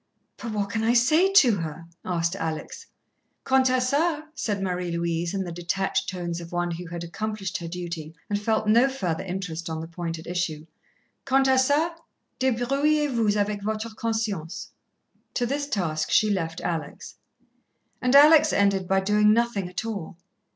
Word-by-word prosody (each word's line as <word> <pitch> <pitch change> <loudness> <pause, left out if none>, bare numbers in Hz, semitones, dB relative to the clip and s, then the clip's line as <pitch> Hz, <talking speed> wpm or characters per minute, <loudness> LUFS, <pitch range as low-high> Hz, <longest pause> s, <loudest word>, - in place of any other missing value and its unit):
"But 230 - -6
what 200 -1 -2
can 220 +1 -1
I 230 +1 +3
say 310 +11 +4
to 255 - +6
her?" 165 -1 -5 0.2
asked 170 0 -1
Alex. 165 - -5 0.6
"Quant 265 0 +3
à 255 0 +3
ça," 295 +5 +1
said 205 -9 -2
Marie 180 -2 -2
Louise, 170 0 -1
in 195 - -1
the 175 - -6
detached 175 +3 -1
tones 175 -2 -4
of 170 - -10
one 175 0 -1
who 170 +1 -6
had 170 0 -6
accomplished 195 +2 -4
her 170 - -6
duty 170 -2 -6
and 205 0 -1
felt 215 0 0
no 235 +5 +5
further 190 -10 -2
interest 180 -3 -5
on 160 0 -3
the 160 - -6
point 170 0 -5
at 160 - -11
issue, 170 -3 -3 0.6
"quant 270 0 +3
à 265 - +4
ça, 285 +6 +3 0.5
débrouillez 275 +4 +1
vous 215 -3 +2
avec 205 0 -1
vôtre 215 +2 -3
conscience." 220 -8 -3 0.6
To 245 - +1
this 280 +3 -2
task 160 - -1
she 215 -1 +4
left 165 -4 -2
Alex. 165 -3 -5 0.8
And 250 +2 +2
Alex 305 +2 +8
ended 200 -2 +2
by 195 +1 +2
doing 210 +2 +4
nothing 220 -5 +1
at 180 +5 -4
all. 195 -6 -5
200 Hz, 170 wpm, -25 LUFS, 170-245 Hz, 0.8 s, Alex